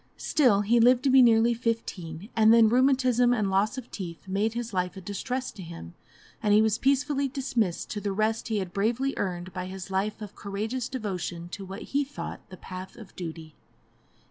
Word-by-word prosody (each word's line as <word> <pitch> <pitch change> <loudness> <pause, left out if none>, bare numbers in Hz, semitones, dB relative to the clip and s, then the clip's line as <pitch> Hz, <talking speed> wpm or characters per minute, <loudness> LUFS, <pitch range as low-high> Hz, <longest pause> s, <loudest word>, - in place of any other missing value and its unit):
Still, 245 -9 +3
he 230 +4 +3
lived 245 +2 +5
to 275 - +3
be 265 0 +8
nearly 230 -1 +5
fifteen, 210 -6 -4
and 220 0 +6
then 230 -1 +7
rheumatism 250 -1 +3
and 205 -4 0
loss 205 +6 +1
of 255 - -8
teeth 170 -4 -7
made 205 +4 0
his 235 -2 -4
life 180 0 -1
a - - -7
distress 250 +7 -4
to 195 - -11
him, 165 - -9 0.5
and 210 -1 +3
he 215 - +6
was 220 0 +1
peacefully 280 +1 +1
dismissed 250 -9 -2
to 210 - -3
the 200 0 -2
rest 215 +3 0
he 220 -2 -1
had 185 -3 -4
bravely 235 +7 0
earned 180 -1 -3
by 185 -1 -4
his 190 0 -8
life 200 +3 -1
of 210 -2 -8
courageous 220 +5 -4
devotion 185 -8 -4
to 195 +2 -7
what 195 +2 -7
he 285 +1 +3
thought 280 +1 -8
the 185 - -10
path 185 +1 -8
of 220 -5 -13
duty. 160 -3 -7
215 Hz, 195 wpm, -27 LUFS, 190-245 Hz, 0.5 s, be